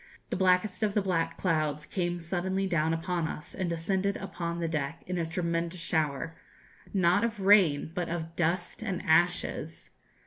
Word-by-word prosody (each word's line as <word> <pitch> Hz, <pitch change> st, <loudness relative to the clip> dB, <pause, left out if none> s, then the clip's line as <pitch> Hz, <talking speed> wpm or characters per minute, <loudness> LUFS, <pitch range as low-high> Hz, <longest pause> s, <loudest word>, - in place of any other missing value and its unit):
the -, -, +1 dB
blackest 185 Hz, +2 st, +2 dB
of 210 Hz, -2 st, +1 dB
the 210 Hz, -, +4 dB
black 165 Hz, -3 st, 0 dB
clouds 155 Hz, -4 st, 0 dB
came 175 Hz, 0 st, -2 dB
suddenly 190 Hz, +3 st, -1 dB
down 160 Hz, -4 st, +1 dB
upon 170 Hz, 0 st, -1 dB
us, 150 Hz, -, -7 dB
and 185 Hz, -2 st, -2 dB
descended 190 Hz, +4 st, 0 dB
upon 170 Hz, -3 st, -4 dB
the 170 Hz, -, 0 dB
deck 155 Hz, 0 st, -3 dB
in 180 Hz, -1 st, -2 dB
a 165 Hz, -, -1 dB
tremendous 170 Hz, +1 st, -2 dB
shower 160 Hz, -1 st, -1 dB, 0.6 s
not 185 Hz, +1 st, +3 dB
of 230 Hz, -3 st, -1 dB
rain, 190 Hz, -7 st, +5 dB
but 175 Hz, -1 st, -2 dB
of 165 Hz, -1 st, -4 dB
dust 175 Hz, +4 st, -1 dB
and 195 Hz, -5 st, -3 dB
ashes. 170 Hz, +2 st, +1 dB
175 Hz, 165 wpm, -29 LUFS, 165-185 Hz, 0.6 s, rain